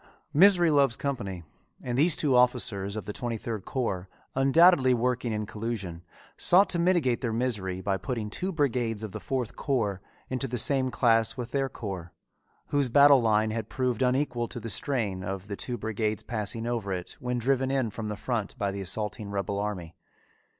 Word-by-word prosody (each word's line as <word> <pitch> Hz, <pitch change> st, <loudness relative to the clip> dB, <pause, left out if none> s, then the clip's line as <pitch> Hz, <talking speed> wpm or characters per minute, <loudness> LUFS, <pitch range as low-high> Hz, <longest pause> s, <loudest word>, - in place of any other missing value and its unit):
"Misery 175 Hz, 0 st, +6 dB
loves 140 Hz, -5 st, +3 dB
company," 100 Hz, -11 st, -4 dB, 0.4 s
and 120 Hz, -1 st, -4 dB
these 155 Hz, +5 st, +4 dB
two 140 Hz, -4 st, +1 dB
officers 115 Hz, -5 st, +1 dB
of 110 Hz, -, -5 dB
the 105 Hz, -, -5 dB
twenty 120 Hz, 0 st, -3 dB
third 110 Hz, -3 st, -5 dB
corps, 95 Hz, -8 st, -3 dB, 0.2 s
undoubtedly 135 Hz, -1 st, +5 dB
working 125 Hz, 0 st, -1 dB
in 105 Hz, 0 st, -2 dB
collusion, 105 Hz, -6 st, -5 dB, 0.3 s
sought 190 Hz, +3 st, +5 dB
to 175 Hz, -, -1 dB
mitigate 170 Hz, -9 st, +2 dB
their 120 Hz, -4 st, -1 dB
misery 105 Hz, -6 st, -2 dB
by 100 Hz, 0 st, 0 dB
putting 105 Hz, +2 st, -4 dB
two 185 Hz, -, -2 dB
brigades 120 Hz, -, -1 dB
of 110 Hz, -, -5 dB
the -, -, -6 dB
fourth 125 Hz, -4 st, -3 dB
corps 105 Hz, -9 st, -1 dB, 0.3 s
into 130 Hz, +1 st, -1 dB
the 125 Hz, 0 st, -3 dB
same 130 Hz, +2 st, +3 dB
class 115 Hz, -2 st, +2 dB
with 120 Hz, -1 st, -5 dB
their 135 Hz, -1 st, 0 dB
corps, 95 Hz, -8 st, -7 dB, 0.6 s
whose 140 Hz, -3 st, +1 dB
battle 140 Hz, +1 st, +7 dB
line 110 Hz, -1 st, +2 dB
had 110 Hz, -1 st, -4 dB
proved 125 Hz, -3 st, -1 dB
unequal 125 Hz, -2 st, +1 dB
to 120 Hz, -, -7 dB
the 115 Hz, 0 st, -6 dB
strain 105 Hz, -6 st, -1 dB
of 95 Hz, +1 st, -5 dB
the 100 Hz, -, -4 dB
two 120 Hz, +4 st, -3 dB
brigades 110 Hz, -1 st, -2 dB
passing 115 Hz, 0 st, -3 dB
over 115 Hz, -4 st, -2 dB
it 90 Hz, -1 st, -4 dB
when 125 Hz, 0 st, -2 dB
driven 130 Hz, +2 st, +1 dB
in 130 Hz, -5 st, 0 dB
from 110 Hz, +1 st, -5 dB
the 105 Hz, -, -3 dB
front 115 Hz, 0 st, -3 dB
by 100 Hz, -4 st, -1 dB
the 100 Hz, 0 st, -5 dB
assaulting 105 Hz, +2 st, -3 dB
rebel 100 Hz, 0 st, -2 dB
army. 95 Hz, -5 st, -4 dB
115 Hz, 185 wpm, -28 LUFS, 105-130 Hz, 0.6 s, battle